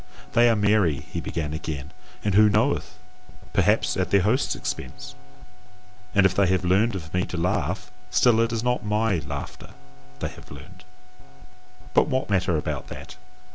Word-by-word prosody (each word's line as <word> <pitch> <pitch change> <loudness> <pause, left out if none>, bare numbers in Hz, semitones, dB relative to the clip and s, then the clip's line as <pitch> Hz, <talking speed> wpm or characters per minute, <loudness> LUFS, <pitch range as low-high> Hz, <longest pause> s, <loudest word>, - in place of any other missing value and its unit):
"They 120 0 +5
are 115 - +4
merry," 100 -6 +3 0.2
he - - -3
began 75 -2 -3
again, 75 -2 -5 0.3
"and 105 - 0
who 105 +2 +6
knoweth? 105 +2 0 0.6
perhaps - - +2
at - - -1
their 100 - +4
host's 120 +7 +1
expense; - - -6 1.0
and 100 -1 +5
if 95 - +4
they 100 0 +3
have 95 0 +1
learned 100 +5 +3
of 80 -3 -7
me 90 0 +1
to 90 - -5
laugh, 85 +2 -1 0.2
still 115 +4 +4
it 115 0 +2
is 115 -1 -2
not 125 0 0
MY 105 -2 +1
laughter 75 -2 -7 0.4
they - - -3
have - - -14
learned. 90 +7 -13 1.1
But - - +4
what 130 -6 -1
matter 95 -4 +2
about 75 - -4
that! - - -9
95 Hz, 165 wpm, -25 LUFS, 85-110 Hz, 1.1 s, who